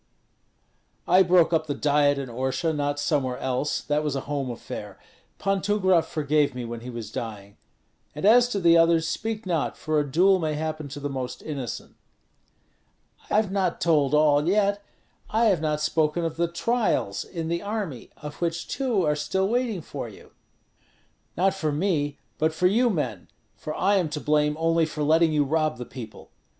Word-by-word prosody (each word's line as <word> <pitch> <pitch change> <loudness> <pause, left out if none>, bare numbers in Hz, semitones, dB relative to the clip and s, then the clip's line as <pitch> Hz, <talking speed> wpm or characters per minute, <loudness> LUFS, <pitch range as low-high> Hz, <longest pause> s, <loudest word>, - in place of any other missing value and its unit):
"I 185 - +6
broke 175 -2 +4
up 160 -1 +1
the 145 - -2
Diet 145 -1 +2
in 135 -1 -4
Orsha, 130 +6 -1
not 145 0 -1
somewhere 135 -4 0
else; 130 +3 -1
that 150 +1 -1
was 150 -2 -1
a 135 - -2
home 140 -2 -3
affair. 120 - -7 0.4
Pan 195 -1 0
Tumgrat 190 -4 +2
forgave 150 -2 0
me 125 -1 -4
when 115 0 -6
he 120 +2 -9
was 115 -2 -7
dying; 100 -3 -6 0.6
and 150 - -3
as 240 +3 +6
to 210 -5 -2
the 170 -2 +5
others, 165 -1 +4
speak 220 +2 -3
not, 170 -5 -1
for 155 -1 0
a 145 -2 -2
duel 185 +5 +4
may 155 -3 -1
happen 155 -1 -4
to 140 +1 -8
the 145 - -3
most 130 -3 -5
innocent." 140 -6 -6 1.3
"I - - 0
have 210 -2 +2
not 190 -3 0
told 150 -4 +2
all 150 0 +4
yet; 200 +1 +2 0.5
I 225 +2 +2
have 180 -6 +1
not 150 -1 -1
spoken 155 +2 +1
of 160 -1 -3
the 170 +1 +1
trials 200 - 0
in 165 -3 -5
the 170 +1 -1
army, 200 - -4
of 150 +1 -9
which 170 0 -2
two 250 -8 0
are 150 0 +2
still 190 +6 0
waiting 230 -6 -1
for - - -6
you." - - -15 1.1
"Not 190 +2 +3
for 160 -6 -2
me, 145 -3 0 0.2
but 155 +1 +1
for 180 - 0
you 235 +7 +4
men; 125 - -3 0.3
for 155 - -6
I 200 +2 +2
am 175 -5 0
to 150 0 -4
blame 150 0 +1
only 165 0 +2
for 155 -1 -4
letting 160 +2 +4
you 150 -1 +2
rob 155 +2 0
the 125 - -6
people. 120 -4 -10
155 Hz, 185 wpm, -25 LUFS, 145-185 Hz, 1.3 s, I